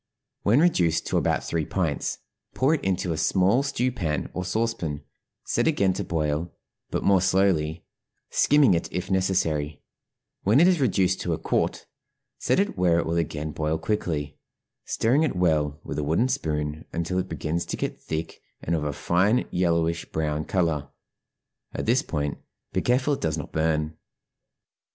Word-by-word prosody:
When 115 Hz, +8 st, +4 dB
reduced 90 Hz, -, +2 dB
to -, -, 0 dB
about -, -, 0 dB
three 85 Hz, -1 st, -1 dB
pints, 80 Hz, -3 st, -1 dB, 0.4 s
pour 135 Hz, +4 st, +3 dB
it 160 Hz, -, -1 dB
into 95 Hz, -2 st, 0 dB
a -, -, -4 dB
small 95 Hz, -, +3 dB
stew 130 Hz, -3 st, 0 dB
pan 80 Hz, -, -2 dB
or 90 Hz, -, -3 dB
saucepan, 90 Hz, -7 st, -2 dB, 0.4 s
set -, -, +1 dB
again 95 Hz, -1 st, +2 dB
to -, -, -3 dB
boil, 80 Hz, 0 st, -1 dB, 0.4 s
but -, -, -2 dB
more 95 Hz, -2 st, +4 dB
slowly, 95 Hz, -4 st, +1 dB, 0.5 s
skimming 145 Hz, -8 st, +5 dB
it 85 Hz, -, -1 dB
if 90 Hz, +2 st, -3 dB
necessary; 80 Hz, -6 st, 0 dB, 0.6 s
when 110 Hz, +7 st, +4 dB
it 170 Hz, -, +7 dB
is 180 Hz, -5 st, +3 dB
reduced 95 Hz, -6 st, +2 dB
to 85 Hz, -, -1 dB
a -, -, -1 dB
quart, -, -, -1 dB, 0.5 s
set -, -, +2 dB
it 200 Hz, -, 0 dB
where 90 Hz, -2 st, +3 dB
it 85 Hz, -, +1 dB
will 85 Hz, +1 st, -1 dB
again 80 Hz, -2 st, -2 dB
boil 75 Hz, +1 st, -1 dB
quickly, 80 Hz, -8 st, -2 dB, 0.5 s
stirring 125 Hz, +7 st, +2 dB
it 155 Hz, -10 st, +1 dB
well 75 Hz, -4 st, +1 dB
with -, -, -4 dB
a -, -, -1 dB
wooden 85 Hz, -, +1 dB
spoon 75 Hz, -, -2 dB
until 85 Hz, +2 st, -1 dB
it 95 Hz, +1 st, -3 dB
begins 85 Hz, +2 st, -2 dB
to -, -, -3 dB
get -, -, -4 dB
thick 80 Hz, +1 st, -5 dB, 0.2 s
and 85 Hz, -, -1 dB
of 75 Hz, -, -1 dB
a 75 Hz, -1 st, -2 dB
fine 95 Hz, -, +2 dB
yellowish 85 Hz, -1 st, +1 dB
brown 75 Hz, -1 st, -2 dB
color; 80 Hz, -6 st, 0 dB, 0.9 s
at -, -, -3 dB
this 120 Hz, +3 st, +3 dB
point 75 Hz, -2 st, -3 dB, 0.3 s
be -, -, +1 dB
careful 130 Hz, +4 st, +2 dB
it 140 Hz, -, -3 dB
does 80 Hz, -1 st, 0 dB
not 75 Hz, -, -6 dB
burn. 80 Hz, 0 st, 0 dB
85 Hz, 170 wpm, -25 LUFS, 80-100 Hz, 0.9 s, it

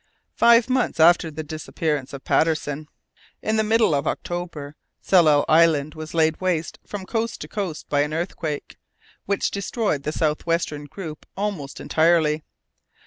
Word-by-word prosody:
Five 235 Hz, 0 st, +5 dB
months 255 Hz, -8 st, 0 dB
after 170 Hz, 0 st, +5 dB
the 155 Hz, +1 st, -6 dB
disappearance 150 Hz, -2 st, -3 dB
of 140 Hz, -1 st, -8 dB
Patterson, 155 Hz, -2 st, 0 dB, 0.6 s
in 220 Hz, +1 st, 0 dB
the 220 Hz, -, +3 dB
middle 220 Hz, -4 st, +3 dB
of 140 Hz, -1 st, 0 dB
October, 165 Hz, -5 st, -4 dB, 0.3 s
Tsalal 155 Hz, -6 st, +5 dB
Island 155 Hz, -2 st, +4 dB
was 155 Hz, 0 st, -8 dB
laid 160 Hz, 0 st, +2 dB
waste 175 Hz, -3 st, -1 dB
from 200 Hz, -2 st, -6 dB
coast 225 Hz, +2 st, -2 dB
to -, -, -6 dB
coast 190 Hz, -7 st, -4 dB
by 145 Hz, -1 st, +2 dB
an 150 Hz, +1 st, -1 dB
earthquake, 160 Hz, -2 st, -4 dB, 0.5 s
which 200 Hz, 0 st, 0 dB
destroyed 200 Hz, -, -1 dB
the 150 Hz, -, -3 dB
south 155 Hz, -1 st, 0 dB
western 160 Hz, -3 st, -1 dB
group 155 Hz, -1 st, -8 dB
almost 190 Hz, -9 st, -3 dB
entirely. 160 Hz, -1 st, +2 dB
160 Hz, 145 wpm, -23 LUFS, 150-190 Hz, 0.6 s, Five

